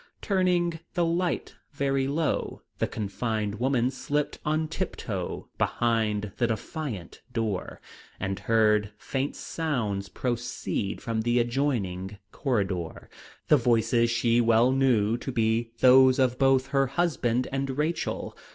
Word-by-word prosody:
Turning 180 -4 +1 0.2
the 175 -2 +2
light 170 +1 -1 0.2
very 135 -1 0
low, 155 +3 -1 0.2
the - - +1
confined 110 0 -3
woman 130 -1 +2
slipped 145 +3 -2
on 155 +1 0
tip 175 +3 -3
toe 95 -5 -4
behind 110 -3 0
the 120 - +2
defiant 115 - -5
door, 110 -5 -3 0.4
and 95 0 -2
heard 105 -2 +2
faint 135 +5 -3
sounds 110 -12 -2
proceed 120 -4 -3
from 115 -1 -1
the 120 +2 +1
adjoining 115 -7 -1
corridor, 100 - -2 0.4
the 150 - +6
voices 115 -1 +2
she 115 0 +2
well 115 +2 +4
knew 120 -5 +3
to 135 - -5
be 115 -1 +1
those 130 0 +7
of 125 -2 +2
both 135 -1 +3
her 135 -1 +2
husband 130 -5 0
and 135 0 -2
Rachel. 160 +2 -2
120 Hz, 125 wpm, -27 LUFS, 110-140 Hz, 0.4 s, those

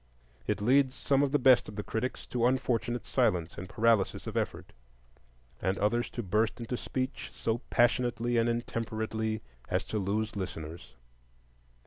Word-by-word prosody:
It - - 0
leads 130 +4 +4
some 140 -1 +2
of 140 -2 +2
the 145 - +4
best 130 -4 +5
of 105 - -9
the 105 - -3
critics 120 +5 -3
to 120 -1 +1
unfortunate 125 -2 0
silence 90 -10 +1
and 90 +1 -7
paralysis 110 -3 +2
of - - -5
effort, - - -2 0.9
and 95 +1 0
others 120 +4 +1
to 120 - -1
burst 105 +5 +1
into 120 +1 -3
speech 130 +2 -3
so 115 +1 -1
passionately 120 0 +2
and 115 +1 +3
intemperately 110 -2 -2 0.3
as - - +1
to 110 - -3
lose 105 +3 -1
listeners. 85 -4 -6
115 Hz, 150 wpm, -30 LUFS, 105-125 Hz, 0.9 s, best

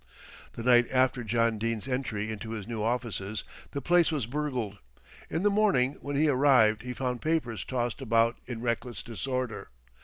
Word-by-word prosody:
The 115 - -6
night 120 -1 +5
after 130 -1 +2
John 115 0 +1
Dene's 115 +1 -2
entry 120 -5 -2
into 110 +1 -6
his 105 -3 -6
new 115 -2 -3
offices 110 -3 -2 0.3
the 140 -2 -5
place 175 +1 +4
was 145 -7 -1
burgled. 125 -6 -3 0.5
In 165 +4 -1
the 205 - +4
morning 195 -11 +3
when 145 0 -4
he 155 +3 +3
arrived 130 -6 +4
he 125 - -5
found 125 -1 -3
papers 155 -9 -1
tossed 120 -1 -2
about 115 -1 +2
in 120 -3 -5
reckless 120 0 -2
disorder. 125 0 -4
120 Hz, 165 wpm, -29 LUFS, 115-135 Hz, 0.5 s, night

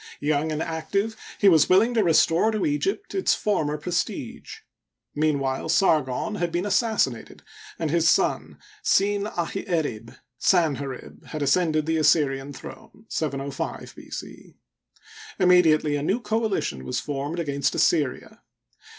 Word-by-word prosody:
Young 150 +1 0
and 155 +1 -2
active, 195 +7 -2 0.2
he 205 - +3
was 160 -6 +5
willing 210 +6 +4
to 225 -3 +2
restore 170 +3 +3
to 215 -1 -1
Egypt 365 +7 -2
its 385 - +2
former 155 -8 -1
prestige. 175 +3 -4 0.6
Meanwhile 145 -2 -1
Sargon 160 +2 +1
had 175 -1 -1
been 175 +3 -1
assassinated, 205 - 0 0.3
and 160 -3 -2
his 170 0 +3
son, - - +1 0.3
Siip 205 +1 +1
ahi 175 +3 -2
erib 130 -10 -2 0.2
(Sanherib). 140 -7 0
had 155 -2 -4
ascended 155 +1 +2
the 160 0 0
Assyrian 145 -3 +2
throne 210 +9 -12
(705 140 -2 -4
B. - - -13
c). - - -9 0.8
Immediately 165 -5 +4
a 145 - -2
new 195 +10 0
coalition 215 - -2
was 125 - -2
formed 145 +3 -4
against 140 -4 -1
Assyria. 145 -7 0
160 Hz, 130 wpm, -24 LUFS, 145-195 Hz, 0.8 s, was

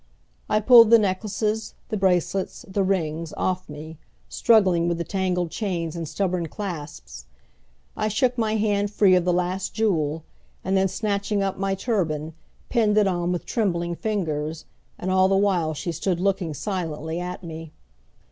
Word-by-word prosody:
I 215 - +3
pulled 230 -1 +8
the 230 - +8
necklaces, 210 +2 -1
the - - -2
bracelets, 190 -1 0
the 195 +1 -1
rings, 165 -4 -1
off 185 -2 -1
me, 155 +2 -9 0.3
struggling 185 -7 +3
with 170 -1 0
the 170 - -2
tangled 180 -3 -1
chains 175 -6 -3
and 165 -2 -4
stubborn 180 0 -1
clasps. 155 - -7 0.7
I - - -1
shook 245 +4 +1
my 220 -2 0
hand 205 -1 +1
free 200 -2 +4
of 180 -1 +3
the 180 - +3
last 180 +2 -1
jewel, 160 -8 0 0.4
and 190 +1 0
then 190 0 +3
snatching 200 +1 -1
up 195 -1 -2
my 195 0 0
turban, 165 -8 -2 0.3
pinned 215 -4 +2
it 210 - +5
on 175 -1 0
with 180 - -3
trembling 175 -6 -1
fingers, 160 -7 -3 0.3
and 185 - -3
all 185 0 +4
the 195 0 +2
while 180 -6 +1
she 170 +4 -3
stood 175 +2 -1
looking 185 -4 0
silently 165 -3 -3
at 180 +1 -5
me. 160 -1 -8
185 Hz, 160 wpm, -24 LUFS, 165-205 Hz, 0.7 s, pulled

